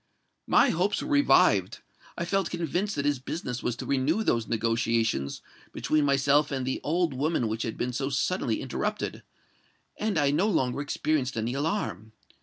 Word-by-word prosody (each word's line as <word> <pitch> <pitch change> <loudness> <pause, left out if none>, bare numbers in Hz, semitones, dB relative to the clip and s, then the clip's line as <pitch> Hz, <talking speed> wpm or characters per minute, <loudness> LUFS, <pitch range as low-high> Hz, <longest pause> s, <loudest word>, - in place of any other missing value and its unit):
My - - +5
hopes 185 +5 0
were - - -5
revived—I 285 -10 +2
felt 195 0 0
convinced 175 +4 -2
that 140 - -2
his 145 -2 +1
business 125 -2 -5
was 120 - -1
to - - -7
renew 140 +10 +1
those 115 - +1
negotiations 115 - 0 0.3
between 155 -1 +1
myself 140 +1 +3
and 135 -2 -2
the 130 - -2
old 165 0 +1
woman 140 -2 0
which 110 +1 -3
had 115 - -3
been 125 +1 -2
so 135 +2 -2
suddenly 135 - 0
interrupted; - - -3 0.8
and 210 -4 -1
I 145 -2 +3
no 170 +8 +2
longer 135 - 0
experienced 145 -3 -1
any 115 +2 -1
alarm. 120 - -2
140 Hz, 160 wpm, -27 LUFS, 120-165 Hz, 0.8 s, My